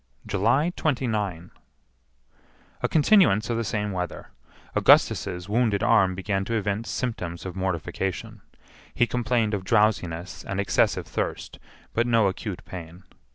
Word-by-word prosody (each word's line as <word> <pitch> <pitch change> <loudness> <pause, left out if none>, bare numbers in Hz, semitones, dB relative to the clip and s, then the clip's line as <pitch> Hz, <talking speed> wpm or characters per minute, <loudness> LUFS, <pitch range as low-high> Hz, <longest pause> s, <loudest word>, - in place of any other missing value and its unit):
July 120 - +1
29. 110 - -1 1.3
A - - 0
continuance 150 - +4
of 115 - 0
the 115 - -1
same 105 -1 -2
weather. 90 -2 -5 0.5
Augustus's 90 +1 +3
wounded 110 -1 +1
arm 95 -5 +4
began 95 +1 -1
to 115 +3 -2
evince 105 +1 -2
symptoms 95 -10 -4
of 90 -1 -6
mortification. 95 0 -3 0.5
He 120 - +4
complained 120 -3 0
of 100 -2 -2
drowsiness 95 -4 0
and 100 - -4
excessive 100 - +1
thirst, - - -4 0.3
but 115 +1 +1
no 115 -3 +4
acute 95 0 -3
pain. 90 0 -9
105 Hz, 125 wpm, -25 LUFS, 95-115 Hz, 1.3 s, continuance